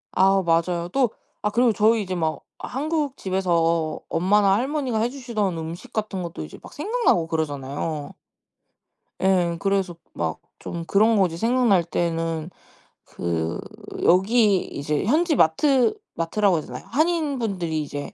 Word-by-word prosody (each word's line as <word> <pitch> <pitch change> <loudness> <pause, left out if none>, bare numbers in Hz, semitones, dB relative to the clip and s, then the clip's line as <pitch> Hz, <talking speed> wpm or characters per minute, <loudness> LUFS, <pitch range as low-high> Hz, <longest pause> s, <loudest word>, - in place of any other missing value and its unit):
아. 195 +1 +4
맞아요. 170 +1 +1
또 255 +3 +2 0.4
아 210 - +3
그리고 235 0 +3
저희 220 +1 +3
이제 185 -1 -4
막 160 -2 -1 0.2
한국 295 0 -2
집에서 170 -4 0
엄마나 195 +2 +3
할머니가 260 -1 -1
해 235 - +1
주시던 230 -9 -2
음식 165 +9 -7
같은 210 -5 -3
것도 165 - -6
이제 75 - -11
막 - - -11
생각나고 400 - +1
그러잖아요. 145 -1 -3 1.1
예. 180 -3 +2
그래서 195 -2 0 0.2
막 80 -1 -3 0.2
좀 170 -1 -6
그런 220 +4 +4
것이 180 -4 +2
생각날 230 -3 +3
때는 165 -1 -2 0.6
그 85 0 -3 0.4
여기 200 +1 +4
이제 145 +1 -2
현지 310 - +2
마트 250 - +3 0.2
마트라고 190 +3 +1
해야 155 - -4
되나요? - - -8
한인분들이 245 - 0
이제 145 0 -6
190 Hz, 290 characters per minute, -23 LUFS, 165-235 Hz, 1.1 s, 아